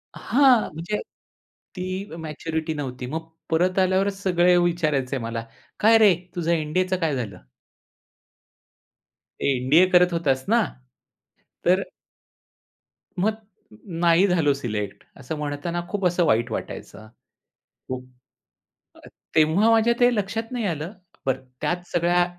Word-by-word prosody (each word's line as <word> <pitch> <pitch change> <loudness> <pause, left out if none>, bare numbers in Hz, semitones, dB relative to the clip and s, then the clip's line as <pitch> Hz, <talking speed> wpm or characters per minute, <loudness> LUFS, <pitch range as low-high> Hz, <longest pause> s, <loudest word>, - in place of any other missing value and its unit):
हां 255 -1 +4
म्हणजे 175 +7 -3 0.8
ती 185 +2 -4
मॅच्युरिटी 160 0 -4
नव्हती. 130 -4 -5
मग 160 +5 -5 0.2
परत 180 +3 +2
आल्यावरच 195 +1 +1
सगळे 180 -1 +4
विचारायचे 155 -6 +1
मला 115 0 -4 0.3
काय 225 +2 +6
रे 205 -5 +6 0.2
तुझं 170 -1 -1
एन-डी-एचं 180 +4 0
काय 160 -5 0
झालं? 105 -7 -4 2.1
एन-डी-ए 140 +6 +4
करत 180 0 +5
होतास 135 -6 0
ना? - - +4 1.0
तर - - +4 1.4
मग 215 +3 +1 0.7
नाही 170 +4 +5
झालो 160 -6 +3
सिलेक्ट, 105 -7 -4
असं 145 +4 -6
म्हणताना 150 +4 -3
खूप 200 -2 -2
असं 175 0 +1
वाईट 115 -1 +2
वाटायचं. 110 0 -7 0.8
खूप 130 0 -6 1.3
तेव्हा 160 +8 +4
माझ्या 225 +1 +4
ते 245 0 +5
लक्षात 225 +4 -3
नाही 240 -4 -2
आलं, 165 +3 -4 0.3
बरं 130 0 -1 0.2
त्याच 175 0 -2
सगळ्या 175 +1 +3
170 Hz, 115 wpm, -24 LUFS, 145-185 Hz, 2.1 s, काय